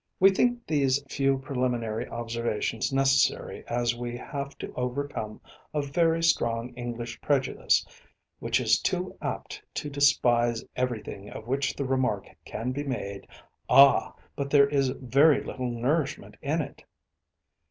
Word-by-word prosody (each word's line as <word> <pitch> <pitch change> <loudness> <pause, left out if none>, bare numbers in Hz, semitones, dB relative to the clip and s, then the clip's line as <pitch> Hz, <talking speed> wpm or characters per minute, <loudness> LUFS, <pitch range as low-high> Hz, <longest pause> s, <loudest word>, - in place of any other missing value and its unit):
We 195 +1 +7
think 240 +4 +1
these 140 -3 +2
few 135 0 +1
preliminary 125 -4 -2
observations 115 -1 -2
necessary 135 0 +2
as 120 0 0
we 120 0 -5
have 140 +2 -6
to - - -7
overcome 125 -4 -4 0.3
a 150 - +1
very 165 +3 +1
strong 120 -6 +1
English 120 -1 -6
prejudice, 140 -3 +2 0.5
which - - +1
is - - +3
too - - -1
apt - - -5
to 145 - -3
despise 120 -5 +3
everything 115 -5 -3
of 110 - -9
which 135 +3 -1
the 140 - -2
remark 130 0 0 0.2
can 120 +3 -3
be 145 +3 -3
made 100 -8 -5 0.4
"Ah! 140 0 +6 0.2
but 140 -1 -3
there 140 -1 +6
is 140 -2 +1
very 135 +4 +3
little 130 -2 -4
nourishment 135 +5 -1
in 155 +3 0
it." 140 -1 -8
130 Hz, 135 wpm, -27 LUFS, 120-140 Hz, 0.5 s, We